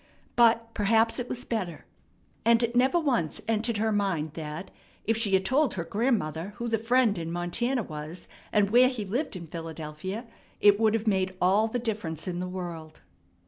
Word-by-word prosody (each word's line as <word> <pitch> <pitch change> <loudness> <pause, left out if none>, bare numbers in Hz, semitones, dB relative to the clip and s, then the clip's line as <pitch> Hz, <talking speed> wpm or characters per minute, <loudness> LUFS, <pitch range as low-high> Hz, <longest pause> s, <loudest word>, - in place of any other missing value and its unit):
But 230 -1 +4
perhaps 225 +3 +2
it 245 - -4
was 250 +1 -4
better. 190 -8 -3 0.6
And 230 +1 +4
it 235 +1 -1
never 260 +7 +4
once 245 - 0
entered 225 0 +1
her 220 +1 +1
mind 185 -7 0
that, 160 +3 -6 0.3
if 225 - +2
she 215 -3 +2
had 190 0 +1
told 275 +5 +2
her 170 - -2
grandmother 195 - -1
who 235 0 -4
the 225 -1 +1
friend 230 -3 +2
in 165 0 -4
Montana 220 +9 -1
was, 155 +1 -7 0.2
and 205 -2 +2
where 250 +2 +6
he 235 -6 -4
lived 235 +6 -2
in 175 -2 -6
Philadelphia, 165 +6 -6 0.3
it 205 0 +6
would 220 -1 +3
have 225 0 -2
made 190 -3 +1
all 195 +5 +3
the 225 - -2
difference 210 -10 -3
in 175 -1 -2
the 180 - -3
world. 170 -4 -7
205 Hz, 185 wpm, -28 LUFS, 175-230 Hz, 0.6 s, where